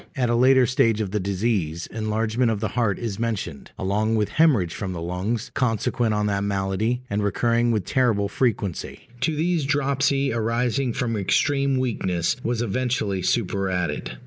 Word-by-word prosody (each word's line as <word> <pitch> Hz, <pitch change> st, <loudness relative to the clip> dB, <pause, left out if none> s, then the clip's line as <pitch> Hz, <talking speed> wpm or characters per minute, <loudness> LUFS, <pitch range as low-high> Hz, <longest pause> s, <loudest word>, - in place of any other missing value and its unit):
At 125 Hz, -3 st, +1 dB
a -, -, +2 dB
later 130 Hz, +1 st, +5 dB
stage 115 Hz, -2 st, +2 dB
of 105 Hz, -4 st, -2 dB
the 105 Hz, -, 0 dB
disease, 95 Hz, -4 st, -1 dB
enlargement 110 Hz, +2 st, 0 dB
of 110 Hz, -2 st, -1 dB
the 110 Hz, -1 st, -1 dB
heart 115 Hz, -2 st, 0 dB
is 115 Hz, -4 st, -4 dB
mentioned, 105 Hz, -10 st, -3 dB
along 105 Hz, +4 st, 0 dB
with 105 Hz, -2 st, +1 dB
hæmorrhage 130 Hz, -, +3 dB
from 95 Hz, +1 st, -4 dB
the 85 Hz, -, -5 dB
lungs 95 Hz, +7 st, -3 dB
consequent 115 Hz, -2 st, 0 dB
on 105 Hz, 0 st, 0 dB
that 100 Hz, -1 st, 0 dB
malady, 100 Hz, +5 st, -1 dB
and 105 Hz, -3 st, -1 dB
recurring 115 Hz, +4 st, +1 dB
with 105 Hz, -5 st, 0 dB
terrible 115 Hz, -6 st, +1 dB
frequency: 100 Hz, -4 st, -2 dB
to 160 Hz, +3 st, 0 dB
these 165 Hz, +1 st, +1 dB
dropsy, 140 Hz, -1 st, +1 dB
arising 120 Hz, +3 st, 0 dB
from 120 Hz, -2 st, -2 dB
extreme 135 Hz, +7 st, +1 dB
weakness, 95 Hz, -9 st, 0 dB
was 120 Hz, 0 st, -1 dB
eventually 120 Hz, -4 st, -1 dB
superadded. 95 Hz, -3 st, -1 dB
115 Hz, 160 wpm, -24 LUFS, 100-125 Hz, -, later